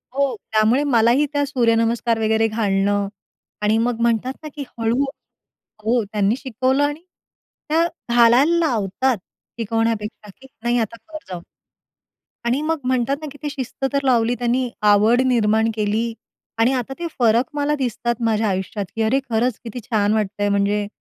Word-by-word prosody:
हो 275 -3 +1 0.2
त्यामुळे 220 +5 +3
मलाही 235 +6 +4
त्या 285 0 +1
सूर्यनमस्कार 230 -3 +1
वगैरे 220 0 +2
घालणं 205 -2 0 0.5
आणि 210 +1 +2
मग 235 0 0
म्हणतात 235 +2 +1
ना 305 - -6
की 290 - -4
हळू 230 +4 +1 0.8
हो. 230 +2 +2
त्यांनी 205 +1 +1
शिकवलं 260 +1 0
आणि 290 +2 -1 0.7
त्या 325 +2 +3 0.3
घालायला 245 +8 +5
लावतात 245 - 0 0.4
शिकवण्यापेक्षा, 225 -1 -2
कि 265 - -13 0.2
नाही 240 +1 +1
आता 225 0 -2
कर 315 -1 -7
जाऊ. 180 -2 -6 1.0
आणि 250 +5 +1
मग 320 +1 -1
म्हणतात 255 +1 +1
ना, 310 - -5
की 290 - -13
ती 295 - -1
शिस्त 270 -1 -5
तर 280 0 +1
लावली 240 -2 +3
त्यांनी 245 +1 0 0.2
आवड 220 +5 +4
निर्माण 220 -3 +2
केली 220 +2 -1 0.5
आणि 235 +4 +4
आता 255 0 -2
ते 345 - -2
फरक 235 +1 +4
मला 295 0 0
दिसतात 240 -3 -1
माझ्या 220 -1 +1
आयुष्यात, 195 +2 -3
की 225 - -2
अरे 240 +5 +2
खरंच 235 +1 0
किती 235 +1 -6
छान 210 -2 +1
वाटतं 210 -1 -2
आहे. 205 - +2
म्हणजे 200 +1 +1
230 Hz, 155 wpm, -21 LUFS, 215-260 Hz, 1.0 s, घालायला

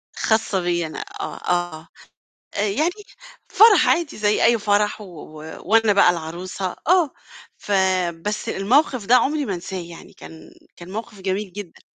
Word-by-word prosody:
خاصة 220 -3 +1
بيّا 175 -1 -1
أنا 155 - -7 0.2
آه، - - -5
آه. 175 -2 -2 0.7
آآ، - - 0
يعني 305 - +1 0.6
فرَح 430 -2 +6
عادي 330 -3 +1
زي 210 0 +1
أي 235 +1 +5
فرَح، 210 +1 +1
و - - -9
و 155 -2 -10
وأنا 225 -1 +4
بقى 200 -2 +5
العروسة، 175 +2 -4
آه، 350 -3 +4 0.5
فبس 190 0 -1
الموقِف 250 +3 +1
ده 245 - +5
عمري 285 +4 +2
ما 200 - -2
أنساه 180 +1 -6
يعني 170 -1 -11
كان 160 0 -13 0.2
كان 175 +1 -11
موقِف 215 0 -7
جميل 190 +1 -2
جدًا. 205 -4 -9
195 Hz, 150 wpm, -22 LUFS, 175-225 Hz, 0.7 s, فرَح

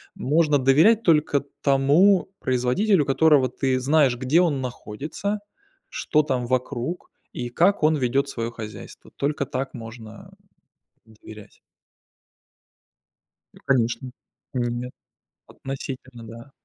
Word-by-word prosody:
можно 150 +1 +2
доверять 155 - +4
только 150 -5 +2 0.2
тому 150 +9 +3
производителю, 135 - +1
которого 145 -1 +4
ты 130 0 -1
знаешь, 140 -1 +3
где 135 +8 +2
он 155 -6 +1
находится, 140 - -5 0.5
что 150 -1 +1
там 130 -4 -2
вокруг, 130 +5 -3 0.2
и 120 0 -5
как 175 +8 +2
он 155 +1 +4
ведет 135 +1 0
свое 115 -3 -4
хозяйство. 110 -3 -10
Только 140 0 -1
так 135 +1 -5
можно, 115 -2 -11 0.8
э, - - -21
доверять. 105 -1 -13 2.0
Э, - - -17
конечно, 125 0 0 0.4
нет. 120 0 -3 0.6
Относительно, 130 -3 -8
да. 115 +4 -12
135 Hz, 110 wpm, -23 LUFS, 120-150 Hz, 2.0 s, доверять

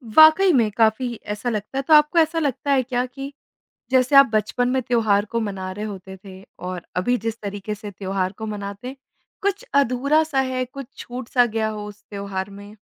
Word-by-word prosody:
वाक़ई 315 +5 +8
में 230 -5 +3
काफ़ी 230 +2 +2 0.2
ऐसा 210 +4 -3
लगता 215 +4 -4
है 275 - +1
तो 315 - +5
आपको 300 +3 +6
ऐसा 325 +1 +2
लगता 285 -1 -1
है 265 -2 +3
क्या 250 0 -1
कि, 275 +2 -8 0.6
जैसे 260 +1 +3
आप 275 0 +10
बचपन 215 +3 +1
में 260 0 +1
त्योहार 220 -4 +2
को 230 +2 -2
मना 195 -4 -4
रहे 210 +3 -5
होते 190 -2 -8
थे 190 -1 -11 0.2
और 180 -1 -5
अभी 245 +7 +1
जिस 225 +1 -3
तरीके 205 +1 -5
से 205 0 -8
त्योहार 190 -1 -2
को 220 - -5
मनाते 205 +2 -6
हैं, 265 - -6 0.5
कुछ 405 +4 -1
अधूरा-सा 280 +3 +2
है, 260 -1 0
कुछ 275 0 -9
छूट-सा 245 0 0
गया 220 -1 -1
हो, 210 -1 -6
उस 210 0 -12
त्योहार 200 -1 -4
में? 205 +2 -12
230 Hz, 195 wpm, -22 LUFS, 205-265 Hz, 0.6 s, आप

